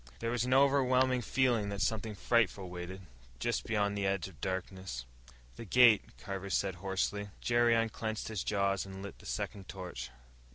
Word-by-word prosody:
There 115 - -2
was 120 0 0
an 125 - -2
overwhelming 130 -2 +4
feeling 120 -4 +1
that 100 0 -4
something 110 -1 -1
frightful 100 -3 +1
waited 90 +2 -6 0.4
just - - -1
beyond 105 -2 +1
the 100 -1 0
edge 95 -1 0
of 90 -5 -15
darkness. 95 -8 -4 0.5
"The - - -6
gate," 115 0 +5
Carver 100 -1 -5
said 95 0 +1
hoarsely. 100 +1 -1
Jerry 120 -1 +3
unclenched 110 -1 -1
his 110 -5 -3
jaws 100 -2 +1
and 95 0 -8
lit 100 - -8
the - - -12
second 95 -2 -4
torch. 90 -8 -6
100 Hz, 165 wpm, -33 LUFS, 95-115 Hz, 0.5 s, gate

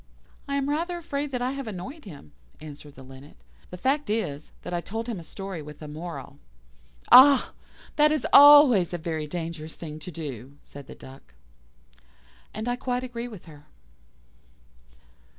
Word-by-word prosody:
"I 280 - -2
am 280 -1 -1
rather 335 +4 -2
afraid 290 -3 -4
that 250 -2 -2
I 255 - -1
have 275 -2 -6
annoyed 215 - -8
him," 145 - -12 0.3
answered 145 -1 -12
the 135 - -13
Linnet. 135 - -14 0.3
"The 180 - -9
fact 275 +8 -1
is, 155 -10 -3
that - - -6
I 175 - -1
told 225 +5 -5
him 230 -5 -5
a - - -10
story 195 0 -7
with 150 0 -11
a 155 - -9
moral." 160 +3 -8 0.7
"Ah! 275 +1 +8 0.5
that 300 0 +5
is 305 -5 -1
always 280 - +8
a - - -2
very 160 -2 -4
dangerous 165 -1 -6
thing 155 -2 -8
to 155 - -9
do," 140 -5 -8
said 140 -1 -13
the - - -11
Duck. 135 +1 -15 1.2
And 215 +3 -6
I 245 0 -1
quite 250 0 -3
agree 240 -1 -6
with 215 -7 -12
her. 150 -2 -15
180 Hz, 170 wpm, -25 LUFS, -, 1.2 s, Ah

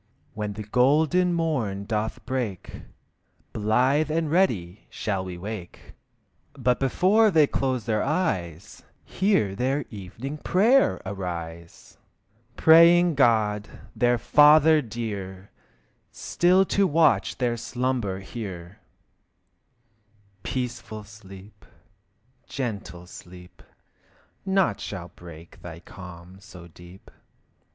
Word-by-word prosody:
When 105 -1 -4
the 105 +1 -7
golden 155 - +2
morn 120 -13 -2
doth 110 0 -3
break, 125 -7 -4 0.7
Blithe 130 +8 +1
and 160 -1 -1
ready 105 - 0
shall 100 -3 -3
we 90 -1 -7
wake. 100 -1 -9 0.6
But 125 -1 0
before 190 - +3
they 160 -6 +4
close 130 -5 -2
their 110 -2 0
eyes, 100 - -3 0.2
Hear 190 - 0
their 130 +5 -1
evening 115 +9 -8
prayer 230 - +3
arise! 85 -3 -7 0.6
Praying 170 +2 +6
God, 110 -6 +1 0.3
their 120 0 +2
Father 150 +4 +5
dear, 100 -5 -7 0.6
Still 185 +2 +2
to 200 +1 +1
watch 145 - +2
their 120 -2 0
slumber 120 -5 -3
here. 95 -3 -8 1.6
Peaceful 120 -3 -5
sleep, 105 -1 -15 0.8
gentle 100 -9 -5
sleep, 90 0 -14 0.9
Naught 190 -1 +1
shall 90 -3 -7
break 85 -1 -13
thy 85 -2 -9
calm 90 +1 -12
so 90 -3 -13
deep. 90 +3 -16
110 Hz, 95 wpm, -25 LUFS, 95-150 Hz, 1.6 s, Praying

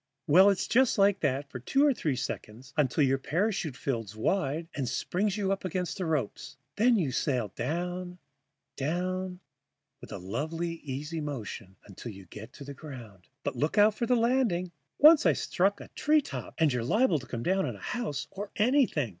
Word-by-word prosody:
Well, 185 +5 +7
it's 195 -2 +1
just 255 0 +3
like 200 0 +4
that 135 +2 0
for 130 - -6
two 270 - +2
or 290 - +4
three 150 - -1
seconds, 125 +2 -6
until 150 -1 +2
your 135 0 +2
parachute 165 - -1
fills 115 -6 -3
wide 155 - 0
and 135 -4 -2
springs 190 +8 -1
you 195 -2 0
up 195 - -2
against 185 +1 -3
the 180 - -1
ropes. 150 -9 -3 0.2
Then 240 +3 +4
you 155 -9 0
sail 125 -5 0
down, 175 - -3 0.6
down, 180 +5 -2 0.6
with - - -12
a - - -4
lovely 155 - -3
easy 150 +4 -4
motion 115 -9 -6
until 105 +4 -8
you 95 -2 -12
get 110 +7 -10
close - - -14
to 140 - -9
the 140 +1 -7
ground. 120 - -11 0.2
But - - -2
look 150 +8 0
out 210 +1 +6
for 235 +2 -2
the 250 - +4
landing. 230 -7 +1 0.3
Once 305 +1 +7
I - - +5
struck 195 +3 0
in - - -9
a - - -17
treetop. 300 -1 0
And 155 -4 +3
you're 125 -2 -1
liable 195 - +3
to 130 - -12
come 120 -1 -4
down 190 +4 +1
on - - -4
houses 235 - -4
or 200 +1 -6
anything." 225 - +2
165 Hz, 190 wpm, -29 LUFS, 130-195 Hz, 0.6 s, Well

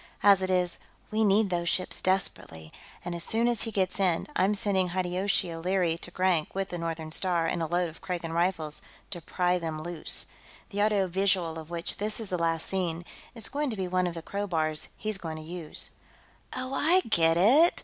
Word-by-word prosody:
As 200 -1 +7
it 185 - -1
is, 180 -1 +1 0.3
we 220 +1 +2
need 205 -1 +3
those 170 -1 0
ships 185 - 0
desperately, 80 - -2 0.3
and 175 - -3
as 170 -1 -4
soon 230 +5 +1
as 240 -3 0
he 225 - -2
gets 190 -2 0
in, 180 -4 +2
I'm 195 +3 +3
sending 195 -2 +1
Hideyoshi 185 +1 0
O'Leary 175 0 +1
to - - -8
Grank 180 -3 +1
with 195 0 -1
the 175 - -4
Northern 165 -1 -4
Star 175 -1 +1
and 165 +1 -1
a 165 - 0
load 175 +2 +1
of 160 - -12
Kragan 175 -3 -4
Rifles, 165 -3 0 0.3
to 175 -3 -5
pry 180 +2 +1
them 160 -2 -4
loose. 170 -2 -3 0.5
The 205 0 -1
audio 205 -2 +3
visual 185 -3 +1
of 160 0 -10
which 170 -1 -1
this 210 +2 -1
is 220 -4 -5
the 180 - 0
last 165 -1 +2
scene 175 -3 -1 0.3
is 225 -3 0
going 290 0 -1
to 220 - -4
be 190 -1 -1
one 185 0 +1
of 175 - -4
the 165 - -6
crowbars 165 -7 -1
he's 215 -2 -1
going 160 -3 -5
to 155 - -8
use." 165 -1 -1 0.6
"Oh! 255 +1 -3
I 335 +7 +4
get 165 - +3
it!" 270 - +5
180 Hz, 205 wpm, -28 LUFS, 165-200 Hz, 0.6 s, As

